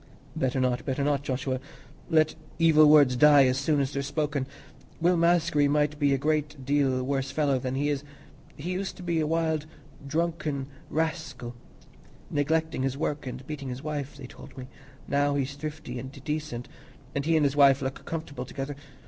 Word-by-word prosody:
"Better 130 0 0
not, 125 -1 +1
better 135 +1 -1
not, 145 -1 +1
Joshua. 130 -1 -2 0.5
Let 155 -2 +3 0.2
evil 155 -2 +6
words 145 -4 +6
die 145 +1 +7
as 130 +1 +2
soon 145 +1 +1
as 135 0 -1
they're 140 - -1
spoken. 140 -1 -2 0.5
Will 175 +2 +3
Maskery 170 -3 +3
might 150 +1 +1
be 145 -2 +3
a 135 - +3
great 150 -1 -1
deal 135 -2 +2
worse 135 0 -1
fellow 140 -1 +1
than 130 +1 -3
he 145 +2 0
is. 145 -1 -1 0.5
He 170 +6 -5
used 190 +1 -3
to 180 - -9
be 170 -2 0
a 155 - +1
wild 160 -1 0 0.4
drunken 155 -3 -1 0.2
rascal, 155 -6 -3 0.8
neglecting 160 0 0
his 135 0 -1
work 145 -2 -2
and 125 +1 -6
beating 140 -2 -5
his 125 +3 -6
wife, 145 -2 -4
they 140 - -9
told 130 - -13
me; 130 -1 -7 0.4
now 145 0 +2
he's 140 0 -1
thrifty 145 -4 -6
and 130 +2 -7
decent, 150 -5 -3 0.5
and 140 - -1
he 165 +2 +2
and 155 - +3
his 140 0 +1
wife 140 -2 +6
look 130 0 -4
comfortable 145 -6 -5
together. 135 +2 -5
145 Hz, 180 wpm, -27 LUFS, 135-155 Hz, 0.8 s, die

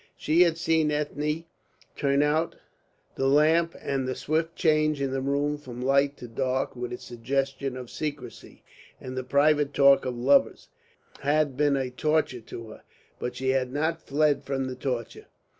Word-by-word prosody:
She 160 +3 +2
had 170 -2 +4
seen 160 -2 +2
Ethne 150 +2 -2 0.5
turn 140 0 +2
out 155 +3 0 0.6
the 135 - 0
lamp, 160 +4 +3
and 135 -2 -2
the 130 - -2
swift 160 +2 -1
change 155 -3 +2
in 135 -1 -1
the 135 0 -2
room 145 +2 0
from 125 -4 -9
light 140 +2 +2
to 120 - -9
dark, 130 +3 -2
with 125 0 -5
its 125 - -7
suggestion 135 +2 -2
of 125 -2 -8
secrecy 145 -6 -7 0.4
and 130 0 -7
the 130 - -3
private 145 +2 +2
talk 140 -1 +6
of 125 -1 -3
lovers, 135 +4 +2 0.5
had 145 -1 +1
been 145 0 +2
a 130 -2 -2
torture 150 -2 0
to 115 0 -9
her. - - -12 0.4
But 125 - -4
she 130 0 -2
had 130 -1 +1
not 160 +3 -1
fled 145 0 +2
from 135 -1 -2
the 130 -1 -5
torture. 125 -3 -4
140 Hz, 170 wpm, -26 LUFS, 130-150 Hz, 0.6 s, talk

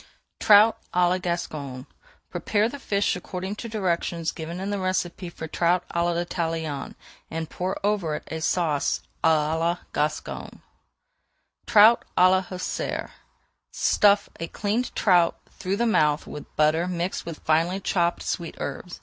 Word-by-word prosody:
TROUT 215 +2 +6 0.2
À 180 0 +4
LA 185 +1 +1
GASCONNE 150 -7 -4 0.5
Prepare 210 0 +1
the 285 +4 -7
fish 200 -6 0
according 185 +2 -5
to 230 - -6
directions 170 -5 -1
given 165 +2 -6
in 195 +2 -3
the 205 - -1
recipe 185 -1 -2
for 160 -1 -7
trout 175 +3 +1
à 170 - 0
l'Italienne, 165 -4 -2 0.3
and 160 -1 -5
pour 185 +1 -3
over 195 -7 0
it - - -6
a 160 0 -4
Sauce 155 -4 0 0.2
à 160 -1 +3
la 170 +1 +1 0.2
Gasconne. 150 +1 -3 1.1
TROUT 220 +3 +7
À 185 +1 +7
LA 190 0 +3
HUSSAR 185 -1 -4 0.6
Stuff 205 0 +3
a 165 - -3
cleaned 215 +7 -1
trout 175 -5 +3
through 190 +2 -3
the 235 - +1
mouth 150 -9 +2
with 150 - -10
butter 155 +3 +3
mixed 180 0 -2
with 165 -2 -6
finely 165 +4 +2
chopped 175 -3 0
sweet 170 -2 -3
herbs. 180 - -6
175 Hz, 145 wpm, -25 LUFS, 160-190 Hz, 1.1 s, TROUT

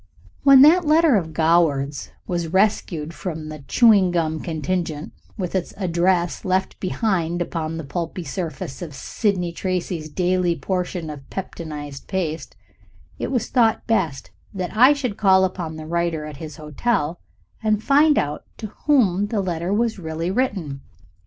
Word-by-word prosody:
When 275 -1 +8
that 340 +5 +6
letter 310 -2 +4
of 165 -5 0
Goward's 155 -4 +1 0.2
was 170 -2 -2
rescued 170 -4 0
from 160 -3 -5
the 155 0 -7
chewing 210 -6 +5
gum 160 -3 0
contingent, 160 -1 -3 0.2
with 180 -4 -3
its 190 -2 -2
address 175 -1 +1
left 185 0 -1
behind 180 -3 -1
upon 165 -2 -3
the 165 - -5
pulpy 170 +4 -4
surface 155 -4 -5
of 155 -5 -7
Sidney 180 - -1
Tracy's 175 -3 -3
daily 180 +1 +1
portion 180 -4 -3
of 140 -2 -11
peptonized 150 -6 -7
paste, 170 -4 -3 0.6
it - - -2
was 240 -4 -1
thought 230 -4 +2
best 170 -11 -1 0.2
that 185 +1 -4
I 255 +6 +7
should 255 -8 -3
call 190 -2 +5
upon 175 -4 -4
the 155 0 -8
writer 170 -1 -1
at 150 -2 -8
his 155 0 -8
hotel 160 - -1 0.4
and 215 -1 +1
find 295 +2 +4
out 145 +1 -1
to 215 -3 -7 0.2
whom 205 -9 +3
the 210 0 -1
letter 175 -1 -2
was 225 0 0
really 165 +1 -3
written. 190 - -2
175 Hz, 150 wpm, -22 LUFS, 160-200 Hz, 0.6 s, When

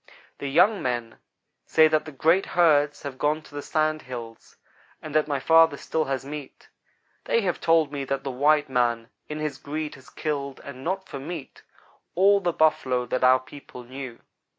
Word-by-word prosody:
The 140 - -4
young 185 +8 +4
men 120 -2 -3 0.5
say 160 0 +6
that 155 -1 +1
the 155 - -8
great 165 +7 +2
herds 150 -4 +3
have 140 -2 -7
gone 155 +1 0
to 150 - -17
the 145 - -5
Sand 155 +1 0
Hills, 115 -3 -9 0.4
and 155 - -9
that 155 0 +2
my 140 -2 -1
father 165 0 +5
still 160 -1 -2
has 135 -1 -3
meat. 145 -1 -9 0.6
They 230 - +2
have 180 -4 -2
told 165 -3 +3
me 140 -2 -3
that 135 0 -2
the 135 - -3
white 145 +3 +3
man, 120 -2 0 0.2
in 150 - -4
his 155 -1 -4
greed, 155 +1 -4
has 130 - -15
killed 140 -3 -4
and 130 -2 -9
not 190 +3 -3
for 140 - -7
meat 155 0 -8 0.5
all 200 +3 +5
the 180 -3 0
Buffalo 130 -6 +1
that 130 +1 -2
our 130 0 +6
people 130 -2 -12
knew. 130 -1 -8
145 Hz, 185 wpm, -25 LUFS, 130-155 Hz, 0.6 s, say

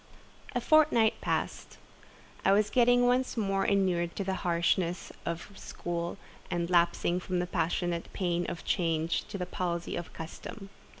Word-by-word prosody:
A - - +3
fortnight 290 -7 +4
passed; - - -2 0.7
I 195 - +5
was 210 +1 +3
getting 245 0 +5
once 250 0 +2
more 195 -3 +1
inured 180 -4 +1
to 200 - -2
the 190 0 -1
harness 170 0 0 0.2
of 170 +4 -4
school, 170 -2 -4 0.3
and 175 -1 -1
lapsing 175 0 +3
from 185 0 -2
the 175 - +1
passionate 175 0 -1
pain 175 -2 -1
of 165 - -6
change 165 -1 0
to - - -6
the 180 - -2
palsy 175 -1 -3
of 175 - -5
custom. 195 +5 -8
180 Hz, 145 wpm, -30 LUFS, 170-200 Hz, 0.7 s, I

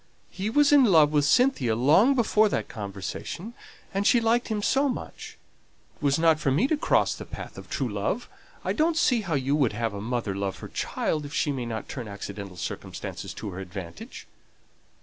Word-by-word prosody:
He 195 +3 -3
was 290 +5 +4
in 290 -2 +7
love 160 -8 +5
with 145 -2 +3
Cynthia 145 - +3
long 160 - +5
before 215 -3 +3
that - - -2
conversation, 105 - -6 0.4
and 195 +1 +1
she 240 - +5
liked 230 +1 +1
him 215 -2 -2
so 275 +5 +2
much. 250 - -7 0.6
It - - -29
was 140 -1 +2
not 160 -1 +4
for 145 - 0
me 145 - +3
to 315 - +3
cross 295 - +2
the - - -8
path - - -9
of - - -11
true - - -1
love. - - -2 0.4
I - - +1
don't 320 +1 +1
see 245 -8 +3
how 175 -7 -2
you 135 +1 +1
would 135 -8 +2
have 115 0 -2
a 100 - -5
mother 115 -2 -2
show 95 - -4
her - - -2
love 95 -1 -2
for - - -10
her - - -27
child 155 -1 -1
if 145 - -7
she 145 - +1
may 125 -4 -3
not 110 -1 -5
turn 125 -5 -6
accidental 100 -2 -7
circumstances 80 -1 -6
to 100 - -6
her 90 - -7
advantage. 90 -3 -8
145 Hz, 210 wpm, -26 LUFS, -, 0.6 s, in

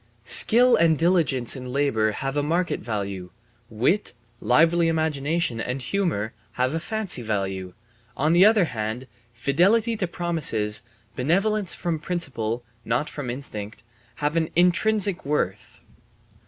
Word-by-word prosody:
Skill 245 +2 +7
and 165 -2 +3
diligence 160 -8 +1
in 125 -1 -7
labour 125 -6 +1
have 135 +5 -4
a 145 - +1
market 170 +5 -1
value; 100 -5 -5 0.4
wit, 125 - 0 0.3
lively 165 +7 +3
imagination, 155 -4 -1
and 125 +3 -3
humour, 135 - -2 0.2
have 130 +7 -1
fancy 215 - -1
value; 95 -4 -3 0.4
on 155 +4 +1
the 175 +2 +6
other 210 -3 +5
hand, 110 -1 -4 0.3
fidelity 180 - +1
to 195 -4 -2
promises, 150 -13 -1 0.3
benevolence 195 +8 +1
from 170 -3 -3
principle 130 -9 -3 0.2
(not 120 +6 -1
from 145 -4 -6
instinct), 110 -5 -7 0.3
have 150 +2 -2
an 160 -1 0
intrinsic 190 +2 +2
worth. 140 -10 -3
150 Hz, 125 wpm, -24 LUFS, 120-175 Hz, 0.4 s, Skill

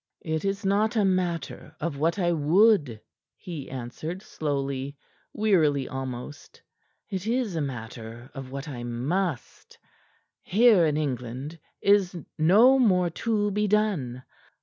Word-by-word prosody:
"It 160 -1 -1
is 200 +1 -2
not 210 +4 +2
a 210 -3 +3
matter 180 -4 -2
of 160 -2 -2
what 165 +5 +1
I 175 -3 +1
would," 160 - +3 0.4
he 160 -6 -8
answered 135 - -6
slowly, 140 -3 -3 0.3
wearily 155 -10 +2
almost. 130 +1 -7 0.5
"It 190 +1 -3
is 235 -5 0
a 160 - 0
matter 120 -2 -7
of 135 -1 -7
what 140 +3 -6
I 125 -5 -6
must. 135 +7 -3 0.6
Here 210 -4 +5
in 150 -1 0
England 135 +2 -4 0.2
is 200 -2 +4 0.2
no 220 +12 +6
more 180 -7 +3
to 210 +2 0
be 210 +1 0
done. 185 - 0
165 Hz, 125 wpm, -26 LUFS, 135-200 Hz, 0.6 s, no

